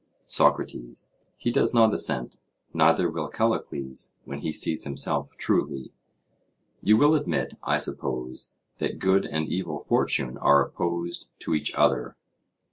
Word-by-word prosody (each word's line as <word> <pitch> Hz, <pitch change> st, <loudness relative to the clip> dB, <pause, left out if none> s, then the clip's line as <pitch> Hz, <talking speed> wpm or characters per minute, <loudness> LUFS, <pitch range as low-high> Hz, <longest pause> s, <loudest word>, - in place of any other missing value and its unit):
SOCRATES: -, -, 0 dB, 0.3 s
He 120 Hz, -, -1 dB
does 120 Hz, -, +2 dB
not 110 Hz, -2 st, +6 dB
assent; 60 Hz, -1 st, -1 dB, 0.3 s
neither -, -, +4 dB
will -, -, -3 dB
Callicles, 65 Hz, -1 st, -2 dB
when 70 Hz, -, -6 dB
he 75 Hz, -, -3 dB
sees 80 Hz, +1 st, +1 dB
himself 70 Hz, -2 st, -2 dB
truly. 65 Hz, -1 st, -1 dB, 0.9 s
You 110 Hz, +1 st, +5 dB
will 145 Hz, +5 st, +5 dB
admit, 150 Hz, -2 st, -1 dB
I -, -, +1 dB
suppose, 65 Hz, 0 st, -3 dB, 0.2 s
that -, -, -2 dB
good 95 Hz, +1 st, +2 dB
and 80 Hz, 0 st, -2 dB
evil 85 Hz, -5 st, -3 dB
fortune 65 Hz, -2 st, +1 dB
are 70 Hz, 0 st, +5 dB
opposed 85 Hz, 0 st, -3 dB
to -, -, -2 dB
each 75 Hz, -, 0 dB
other? -, -, +2 dB
80 Hz, 130 wpm, -26 LUFS, 70-95 Hz, 0.9 s, not